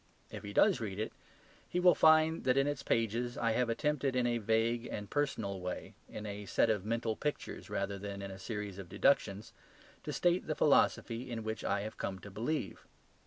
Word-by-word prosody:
If 105 - -6
he 100 -1 -7
does 190 - +4
read 100 -4 -4
it, 110 - -3 0.6
he 180 - 0
will 180 0 +7
find 160 +1 +5
that 130 0 +3
in 135 - +4
its 145 0 -2
pages 115 +2 0
I 115 - +1
have 125 +1 +1
attempted 140 +1 0
in 125 -1 +2
a 120 -1 +1
vague 115 +2 +1
and 105 0 -5
personal 110 -9 -1
way, 90 0 -5 0.2
in 105 - -7
a 100 -1 -6
set 115 - +3
of 105 -4 -1
mental 115 +1 -1
pictures 150 +4 -4
rather 100 -1 -2
than 100 0 -6
in 100 - -5
a 95 - -9
series 105 -1 -5
of 90 -3 -8
deductions, 100 +2 +1 0.5
to - - -5
state 175 +1 +1
the 155 - -1
philosophy 125 -4 +2
in 115 -2 -4
which 110 0 -4
I 100 0 0
have 110 +1 -7
come 95 - -3
to 100 - -10
believe. 115 - -3
115 Hz, 205 wpm, -33 LUFS, 100-130 Hz, 0.6 s, will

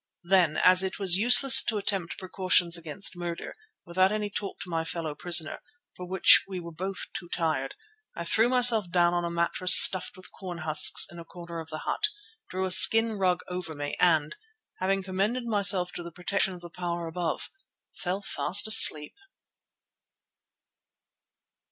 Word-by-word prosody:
Then, 175 -3 0
as 185 0 +3
it 190 -1 -6
was 195 -3 0
useless 250 +4 +7
to 220 - -3
attempt 195 -4 -4
precautions 185 -2 -2
against 170 +4 -5
murder, 175 -1 -9 0.3
without 185 +3 -1
any 210 -1 -5
talk 200 0 -8
to - - -11
my 165 -1 -4
fellow 165 -2 -7
prisoner, 165 0 +2 0.3
for 180 - -11
which 190 0 +3
we 190 -2 -8
were 170 -1 -11
both 190 +4 -7
too 175 - -10
tired, 165 - -5 0.4
I 170 - -8
threw 220 +7 0
myself 240 -6 0
down 175 0 -1
on 175 0 -3
a - - -5
mattress 170 +2 +2
stuffed 185 +1 +4
with 185 - -13
corn 180 -3 -11
husks 155 -1 +3
in 170 - -13
a - - -11
corner 170 0 -12
of 160 0 -12
the 155 0 -9
hut, 425 - 0 0.4
drew 185 +1 -5
a 185 - -6
skin 225 +3 +6
rug 180 -2 -2
over 180 -3 -9
me 145 0 -7
and, 160 -4 0 0.4
having 195 +1 -3
commended 200 +7 -5
myself 200 -5 0
to - - -10
the 170 0 -11
protection 185 +2 -4
of 175 - -15
the 175 -1 -14
Power 175 0 -7
above, 165 -1 -7 0.4
fell 190 +2 -7
fast 205 +2 -1
asleep. 155 -9 +6
180 Hz, 170 wpm, -24 LUFS, 170-195 Hz, 0.4 s, useless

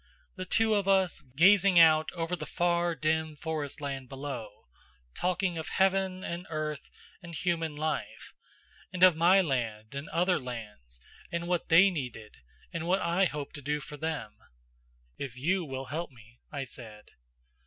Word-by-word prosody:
The 185 -1 -5
two 220 +3 +2
of 200 -2 +1
us, 190 -2 +2
gazing 190 +3 +6
out 160 -1 +6
over 170 0 -2
the - - -7
far 175 -1 +1
dim 160 0 0
forestland 145 -4 -4
below, 135 -7 -7 0.5
talking 180 -1 -1
of 160 - -5
heaven 190 -1 +1
and 175 +2 -5
earth 155 -2 -4 0.3
and 170 -1 -9
human 165 -3 -1
life, 155 +1 -4 0.6
and 180 -1 0
of 185 -3 +8
my 175 +4 +5
land 115 - -2
and 140 +2 -6
other 180 +2 +2
lands 105 - -8 0.3
and 170 0 -3
what 175 -1 -1
they 190 +4 +7
needed 125 -9 -6 0.4
and 170 0 -3
what 190 +2 +3
I 175 +3 +2
hoped 150 -4 -4
to - - -8
do 150 +2 -1
for 150 +1 -9
them 150 -8 -4 0.8
"If 130 -3 -6
you 180 +8 +1
will 135 -3 -5
help 170 +2 -3
me," 115 -2 -19
I 140 -2 -3
said. 110 -4 -9
160 Hz, 155 wpm, -29 LUFS, 135-180 Hz, 0.8 s, of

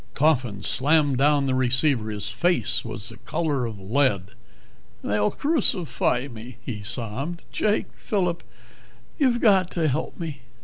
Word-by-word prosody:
Coffin 130 -9 +1
slammed 145 -1 +2
down 145 0 +4
the 130 - +1
receiver. 130 -2 +2
His 105 -1 -4
face 175 0 +1
was 115 -1 -6
the 110 - -9
color 140 - -1
of 110 -3 -7
lead. 100 -2 +1 0.7
"They'll 105 0 +1
crucify 180 - +1
me!" 115 -1 -10
he 105 -4 -4
sobbed. 125 - -3
"Jake 210 0 0
Phillip 180 -5 -1 0.8
you've 255 -5 +3
got 190 -5 +4
to 165 -3 +1
help 145 +4 -3
me." 155 -5 -5
135 Hz, 135 wpm, -24 LUFS, 115-165 Hz, 0.8 s, down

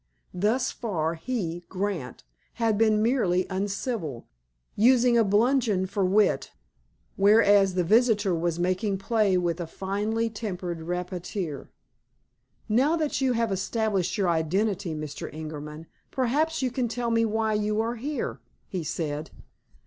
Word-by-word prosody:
Thus 210 +8 +1
far, 165 -9 -2
he, 175 -2 -4
Grant, 185 - -4 0.3
had 225 -2 +1
been 215 0 +3
merely 195 -7 +2
uncivil, 195 - -3 0.5
using 245 +2 +4
a 230 - +5
bludgeon 215 -1 +2
for 200 +1 -1
wit, 195 +2 +2 0.7
whereas 200 -2 +5
the 180 - +2
visitor 210 0 +3
was 170 0 -1
making 185 +3 0
play 200 -1 +2
with 175 -1 -1
a 170 - -4
finely 210 +6 -2
tempered 185 -6 -5
rapier. 180 -2 -4 1.0
"Now 260 +9 +3
that 310 -4 -1
you 260 -2 +2
have 230 -2 0
established 200 0 -1
your 195 -4 +1
identity, 170 +2 0
Mr. 150 -2 -6
Ingerman, 155 0 -7 0.2
perhaps 285 +4 0
you 255 - 0
will 250 -2 +1
tell 235 0 -2
me 230 0 +3
why 220 0 0
you 210 0 0
are 230 +2 -1
here," 240 - -3 0.3
he 185 -3 -4
said. 150 -1 -3
205 Hz, 135 wpm, -26 LUFS, 175-230 Hz, 1.0 s, a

